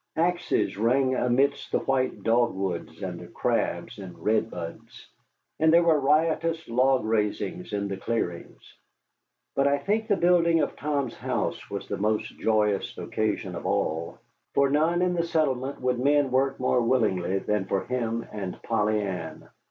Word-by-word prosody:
Axes 175 - +1
rang 130 +4 +2
amidst 130 +3 +1
the - - +3
white 130 -1 -1
dogwoods 100 -7 0
and - - -4
the - - -10
crabs - - -2
and 95 -3 -9
redbuds, 105 -6 -3 0.5
and 160 0 +5
there 170 +1 +6
were 160 -3 +4
riotous 160 +3 +1
log 130 +1 +2
raisings 110 - -1
in 100 -1 -1
the 100 -1 -4
clearings. 95 -5 -4 0.8
But 140 0 +3
I 140 0 +3
think 210 +9 -1
the 205 - +3
building 170 -2 +4
of - - -1
Tom's 140 -4 -2
house - - -3
was - - -5
the - - -3
most 105 +1 0
joyous 105 -3 +1
occasion 110 -1 -2
of - - -5
all, 80 +2 0
and - - -23 0.4
for 140 -1 +3
none 165 +4 +2
in 180 0 +1
the 170 - +1
settlement 140 -5 -1
would 125 -1 0
men 140 0 +3
work 135 +1 +1
more 125 -1 +2
willingly 105 -7 +1
than 105 0 -1
for 95 0 -1
him 115 -2 -2
and 100 -3 -5
Polly 110 -1 +1
Ann. 90 -5 -6
125 Hz, 160 wpm, -26 LUFS, 105-150 Hz, 0.8 s, there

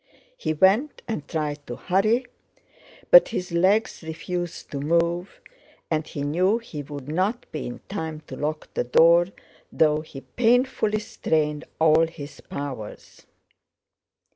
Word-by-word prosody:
He 330 - -2
went, 195 - +2
and 165 -11 -4
tried 150 -2 -3
to 120 - -5
hurry, 215 - +1 0.9
but - - +9
his 180 - -4
legs 190 +6 +2
refused 175 +2 -5
to 140 - -3
move 170 +4 0 0.5
and 155 -1 0
he 140 - -5
knew 180 +9 +2
he 225 -11 -7
would 145 -1 -8
not 190 +10 -1
be 155 - -4
in 120 - -8
time 160 -6 -5
to - - -8
lock 155 +1 -4
the - - 0
door 170 +7 +5 0.4
though 155 -1 +3
he 145 -3 -10
painfully 240 - +1
strained 150 -6 -1
all 160 +1 +5
his 150 -3 -10
powers. 135 -7 -8
165 Hz, 135 wpm, -24 LUFS, 150-195 Hz, 0.9 s, but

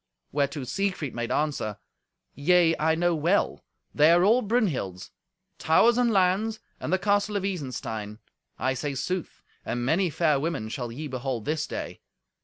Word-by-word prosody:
Whereto 140 0 -1
Siegfried 185 0 -2
made 120 0 -3
answer, 140 -9 -1 0.6
"Yea, 165 +2 +4
I 160 +1 +2
know 175 +1 +2
well. 165 +5 +1 0.3
They 150 +2 +5
are 175 +1 +5
all 225 +6 +5
Brunhild's—towers 195 - 0
and 245 -1 +3
lands, 205 +2 +2 0.2
and - - -4
the 185 - +4
castle 205 +1 +1
of 195 - -3
Isenstein. 120 - -4 0.4
I 130 - 0
say 140 +2 -3
sooth; 180 +6 -4 0.2
and 120 0 -3
many 175 +7 +2
fair 155 -3 +2
women 145 -8 -2
shall 120 0 -4
ye 145 +7 -6
behold 130 -3 -4
this 155 0 -1
day. - - -6
160 Hz, 150 wpm, -26 LUFS, 130-185 Hz, 0.6 s, They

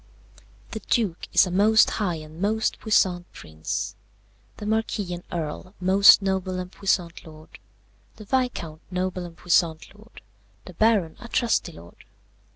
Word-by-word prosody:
"The 220 - -5
Duke 205 -8 0
is - - +5
a 180 - -5
most 210 +4 +5
high 180 -5 0
and 155 +1 -10
most 220 +2 0
puissant 180 -5 +1
prince, 80 0 -5 0.6
the 210 - -7
Marquis 215 -3 -1
and 175 0 -7
Earl 170 +4 -5
most 195 +2 +6
noble 190 -1 -1
and 180 0 -6
puissant 180 -4 -1
lord, 155 -1 -14 0.6
the 215 - -12
Viscount 200 -11 -2
noble 185 0 -3
and 170 -1 -12
puissant 170 -2 0
lord, 215 +3 -17 0.4
the - - -11
Baron 210 -8 +2
a 240 - -10
trusty 235 0 0
lord. 85 +1 -15
185 Hz, 145 wpm, -24 LUFS, 170-210 Hz, 0.6 s, most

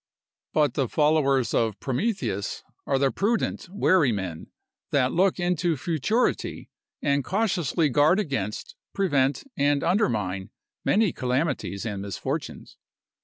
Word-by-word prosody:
But 150 -5 +3
the 130 -3 0
followers 150 -4 +2
of 110 -3 +1
Prometheus 130 - -2 0.2
are 135 - +2
the 135 0 +2
prudent, 220 0 -1
wary 185 - +3
men, 95 -6 -4 0.4
that 130 -2 +2
look 190 +1 +2
into 175 -2 +1
futurity, 170 - -1 0.3
and 140 -1 +2
cautiously 180 - +1
guard 150 - +4
against, 135 - -3 0.2
prevent, 145 -8 +1
and 145 0 +2
undermine 105 - 0 0.3
many 210 -3 +2
calamities 130 -5 -1
and 100 -3 -3
misfortunes. 100 -1 -5
145 Hz, 115 wpm, -25 LUFS, 120-180 Hz, 0.4 s, guard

